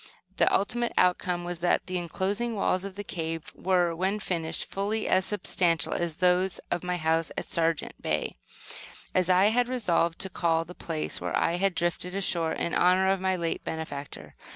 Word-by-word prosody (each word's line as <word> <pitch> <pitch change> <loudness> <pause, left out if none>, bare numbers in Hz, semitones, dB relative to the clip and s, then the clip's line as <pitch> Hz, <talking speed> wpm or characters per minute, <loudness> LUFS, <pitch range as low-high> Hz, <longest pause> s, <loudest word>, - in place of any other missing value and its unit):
The - - +4
ultimate 240 +4 +1
outcome 180 -1 +2
was, 175 -1 -5
that 175 +1 +1
the 185 -1 -2
inclosing 200 +7 -2
walls 185 -2 +1
of 195 -1 -7
the 205 - -5
cave 165 -4 -4
were, 180 -2 +1
when 190 +4 0
finished, 165 -5 -2
fully 210 +3 -2
as 185 0 +3
substantial 180 -4 +1
as 170 -2 -1
those 180 +1 +3
of 175 - -1
my 180 0 -1
house 160 0 +1
at - - -2
"Sargent" 165 -1 0
Bay, - - -1 0.8
as 185 0 +2
I 185 +3 +5
had 245 +2 +2
resolved 170 -9 +1
to 190 - +2
call 165 -1 +1
the 175 - -10
place 160 -3 -3
where - - -1
I 170 - +1
had 195 -1 +1
drifted 175 +1 -2
ashore, 170 -4 +1
in 170 - -2
honor 185 +1 +4
of 195 -1 0
my 190 0 +1
late 170 -2 -2
benefactor. 145 - -6
180 Hz, 180 wpm, -28 LUFS, 165-190 Hz, 0.8 s, I